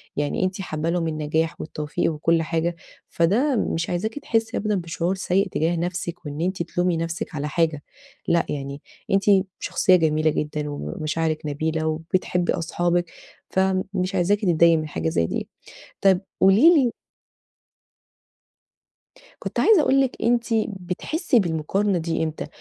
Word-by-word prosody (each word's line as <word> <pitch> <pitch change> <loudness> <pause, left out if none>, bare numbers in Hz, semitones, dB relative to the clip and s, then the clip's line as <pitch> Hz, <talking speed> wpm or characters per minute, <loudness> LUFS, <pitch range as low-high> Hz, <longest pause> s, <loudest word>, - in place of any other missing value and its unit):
يعني 145 +5 -1
أنتِ 185 +1 -1
حابة 155 -3 -3
لِهم 170 -1 0
النجاح 160 +1 -1
والتوفيق 150 +1 -2
وكل 165 +2 +1
حاجة، 165 +1 -1 0.3
فده 230 - +2
مش 165 -6 -1
عايزاكِ 220 +10 -2
تحسي 225 -4 -1
أبدًا 210 0 0
بشعور 175 +1 -2
سيء 190 +2 +1
تجاه 165 0 0
نفسِك، 170 0 -4
وإن 145 +1 -5
أنتِ 185 0 -1
تلومي 175 0 0
نفسِك 165 0 -4
على 150 0 -2
حاجة. 155 -1 0 0.4
لأ، 170 -1 +2
يعني 140 0 -5 0.3
أنتِ 195 0 +3 0.4
شخصية 185 - +3
جميلة 155 -2 +2
جدًا، 150 0 -3
ومشاعرِك 155 - -2
نبيلة، 155 +2 -1
وبتحبي 175 +2 0
أصحابِك 175 0 0 0.4
فمش 190 0 0
عايزاكِ 195 +3 +2
تضايقي 170 -3 +4
من 155 -1 -3
حاجة 80 - -2
زي 85 +1 +1
دي. - - -3 0.5
طب 190 -2 +4 0.2
قولي 225 - +7
لي 260 -6 +3 2.5
كنت - - -4
عايزة 425 -8 +6
أقول 275 -1 +3
لِك 265 -2 -1
أنتِ 235 0 +3 0.2
بتحسي 210 - -1
بالمقارنة 185 +3 0
دي 165 -1 -1
إمتى؟ 160 -1 -4
170 Hz, 140 wpm, -23 LUFS, 155-190 Hz, 2.5 s, قولي